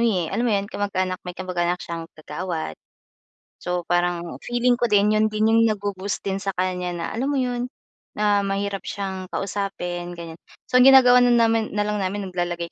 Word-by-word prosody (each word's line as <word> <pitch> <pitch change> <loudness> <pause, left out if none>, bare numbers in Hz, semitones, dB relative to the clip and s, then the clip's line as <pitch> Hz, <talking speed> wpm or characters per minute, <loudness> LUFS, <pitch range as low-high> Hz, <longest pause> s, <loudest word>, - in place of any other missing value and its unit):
eh, 170 -3 -2
alam 235 - 0
mo - - +2
'yon 200 0 -1
kamag-anak, 185 -2 -2
may 180 - -6
kamag-anak 180 -1 -1
siyang 165 -1 -6
kagawad. 160 - -5 0.9
So, 180 -1 -2
parang 175 0 0 0.2
feeling 240 +1 +1
ko 240 -1 0
din 210 +1 +4
'yon 215 0 +3
din 215 +1 +2
yung 230 - +5
nag-bo-boost 200 -2 -3
din 195 0 -2
sa 200 - -2
kanya, 180 -1 -1
na 170 - -3
alam 260 +5 -1
mo 285 - 0
'yon? 245 -1 -1 0.5
Na 205 -1 +3
mahirap 200 0 -2
siyang 190 -2 -4
kausapin 180 -3 -4
gan'yan. 165 -1 -9 0.3
So, 250 - +3
ang 255 - +8
ginagawa 250 -2 +8
namin, 230 -3 +3
na 210 - +2
lang 210 -1 -1
namin 195 0 -3
naglalagay 175 -1 -3
195 Hz, 180 wpm, -23 LUFS, 180-215 Hz, 0.9 s, ang